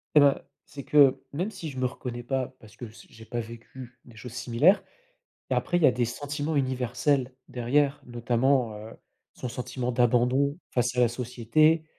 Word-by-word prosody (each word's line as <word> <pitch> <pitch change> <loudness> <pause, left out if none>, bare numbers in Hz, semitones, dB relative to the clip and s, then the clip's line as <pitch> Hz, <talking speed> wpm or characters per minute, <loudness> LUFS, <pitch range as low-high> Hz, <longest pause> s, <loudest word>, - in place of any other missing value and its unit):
Et - - +9
bah, 140 -1 +4 0.2
c'est 140 - -9
que, 140 -2 +5
même 180 +9 -1
si 180 -6 -7
je 130 -2 -7
me 130 - +1
reconnais 120 -1 -5
pas, 130 0 -2
parce 110 -1 -16
que 120 - -7
s 110 0 -14
j'ai 115 0 -14
pas 120 - -4
vécu 120 +2 -9
des 120 - -16
choses 115 +1 -9
similaires 125 - +3 0.7
et - - +2
après, 175 - 0
il 175 - +1
y - - +7
a 130 - +5
des 120 -1 0
sentiments 145 +5 -3
universels, 130 0 0 0.2
derrière, 140 +4 +1
notamment, 120 +1 +1
heu, 110 +1 -9 0.4
son 125 - -5
sentiment 125 +1 -4
d'abandon, 125 +5 +2
face 125 0 0
à - - +3
la 120 - +6
société, 125 +7 +2
125 Hz, 185 wpm, -27 LUFS, 120-140 Hz, 0.7 s, Et